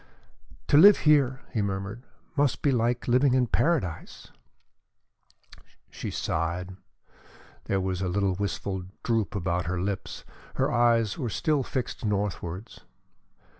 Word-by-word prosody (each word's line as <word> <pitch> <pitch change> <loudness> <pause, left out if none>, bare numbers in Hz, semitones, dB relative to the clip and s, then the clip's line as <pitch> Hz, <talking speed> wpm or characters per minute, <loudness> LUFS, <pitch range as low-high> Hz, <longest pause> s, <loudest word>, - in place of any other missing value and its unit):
"To 145 - +6
live 200 +6 +9
here," 140 -4 +4
he 110 - 0
murmured, 100 +4 -4 0.3
"must 145 -3 +1
be 145 - +3
like 120 0 0
living 130 +2 +3
in 130 -1 +3
Paradise!" 125 - -1 1.6
She - - -6
sighed. 90 +3 -3 0.9
There 95 - 0
was 95 -1 -2
a 95 - -1
little 100 +1 +1
wistful 95 -1 -3 0.2
droop 115 -4 0
about 90 -1 -1
her 90 0 -2
lips; 95 +1 -4 0.3
her - - +1
eyes 115 -3 +2
were 120 - -2
still 150 +5 0
fixed 130 -1 -4
northwards. 100 -2 -3
105 Hz, 125 wpm, -27 LUFS, 95-125 Hz, 1.6 s, live